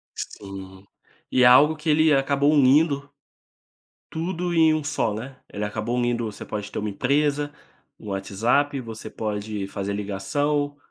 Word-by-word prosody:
Sim 95 -1 -8 0.5
e 130 - +4
é - - +7
algo 140 +6 +7
que 155 +1 -4
ele 155 0 +4
acabou 140 +1 +2
unindo, 145 +1 +4 1.0
tudo 175 +1 -2
em 160 -2 +5
um 155 - -2
só, 145 -6 0
né? 130 +5 -7
Ele 105 - -3
acabou 110 +3 -3
unindo, 120 -1 0
você 105 -2 -7
pode 105 -1 -5
ter - - -6
uma 105 - -2
empresa, 145 +7 0 0.5
um 105 - -9
WhatsApp 115 +9 0
você 115 -3 -8
pode 105 -1 -4
fazer 100 0 -4
ligação, 145 +9 -1
130 Hz, 150 wpm, -24 LUFS, 105-145 Hz, 1.0 s, é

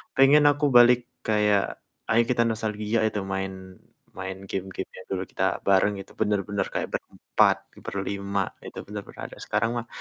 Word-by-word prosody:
pengen 140 +2 +6
aku 145 +1 0
balik 120 0 +7 0.3
kayak, 105 -2 +3 0.5
"Ayo 115 +2 +5
kita 120 -2 +2
nostalgia 110 0 -1
itu 105 - -2
main 95 0 -2 0.7
main 95 0 -4
game-game 95 0 -4
yang 95 - -10
dulu 95 -1 -1
kita 95 - -2 0.2
bareng." 100 +1 +4
Itu - - -14
bener-bener 100 -1 0
kaya - - -1
berempat, - - +1 0.3
berlima, 100 0 -2 0.3
itu - - -11
bener-bener 105 -1 -8
ada, - - -13
sekarang 115 - +1
mah 115 -1 -4
105 Hz, 150 wpm, -26 LUFS, 95-115 Hz, 0.7 s, balik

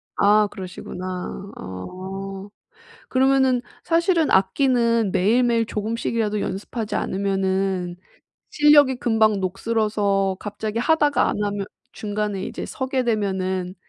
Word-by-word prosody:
아. 210 +1 +4
그러시구나. 185 +1 -6
어. 190 - -7 0.6
그러면은 265 -1 +3 0.2
사실은 335 -1 +2
악기는 230 +1 +2
매일매일 230 +4 +2
조금씩이라도 220 0 -2
연습하지 210 +3 -4
않으면은 190 -2 -1 0.6
실력이 295 -3 +5
금방 220 -4 +2
녹슬어서 200 -1 0
갑자기 215 +2 -4
하다가 290 -1 +3
안 210 - -2
하면 205 -1 -2 0.3
중간에 210 -2 -3
이제 - - -5
서게 260 0 -2
되면은 190 -5 -1
210 Hz, 270 characters per minute, -23 LUFS, 190-240 Hz, 0.6 s, 실력이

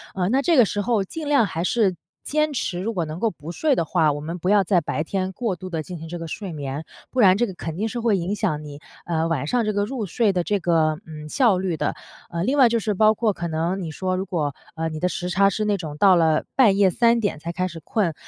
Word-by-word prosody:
呃， 180 -2 0
那 265 +4 +2
这 330 +1 +3
个 245 - +7
时 205 +1 -2
候 215 -1 +1
尽 300 +9 -6
量 280 -6 +4
还 165 -3 -3
是 195 -1 +2 0.3
坚 305 0 0
持 180 -8 -2
如 220 +5 -2
果 175 -5 -1
能 155 +2 -6
够 225 +1 +1
不 160 0 -9
睡 295 - +1
的 170 - +1
话， 160 -2 +2
我 145 - -5
们 165 +4 -5
不 180 +2 -2
要 205 -1 +5
在 180 -2 +2
白 150 0 -2
天 185 +2 -2
过 215 -1 -2
度 185 +2 -8
地 165 -3 -2
进 175 +3 -8
行 165 +1 -8
这 175 +1 -6
个 165 - -6
睡 190 +3 -6
眠， 145 +1 -5 0.2
不 255 - -3
然 190 -4 +6
这 240 - +1
个 190 - -6
肯 165 -2 -5
定 215 +5 -2
是 240 - -4
会 225 -4 +2
影 180 +4 -2
响 155 -6 -1
你， 145 -1 -9 0.3
呃， 165 -1 0
晚 150 -4 -1
上 240 +6 +1
这 215 - 0
个 205 0 +1
入 225 +1 -3
睡 210 +3 +1
的 180 -2 0
这 205 +3 0
个， 160 -3 +1
嗯， 150 -1 -8
效 220 - +3
率 185 -2 -1
的。 - - -2 0.3
呃， 170 0 -2
另 260 +8 +1
外 250 -3 +7
就 235 - +1
是 215 -1 -1
包 215 +2 +4
括 215 -1 +1
可 175 -2 -4
能 170 +4 -1
你 170 - -4
说 185 +4 -2
如 190 +1 -2
果， 155 -6 -1 0.2
呃， 160 0 -2
你 155 -1 -6
的 180 - +1
时 180 +1 -4
差 195 +2 +4
是 215 +2 -2
那 210 -1 +2
种 155 -6 -6
到 190 +3 +6
了 160 -2 +3
半 220 -7 +5
夜 195 -2 +4
3 235 +4 +3
点 205 -8 -1
才 170 +2 -5
开 185 +1 -1
始 170 -2 -8
困， 195 -5 0
185 Hz, 300 characters per minute, -23 LUFS, 165-215 Hz, 0.3 s, 个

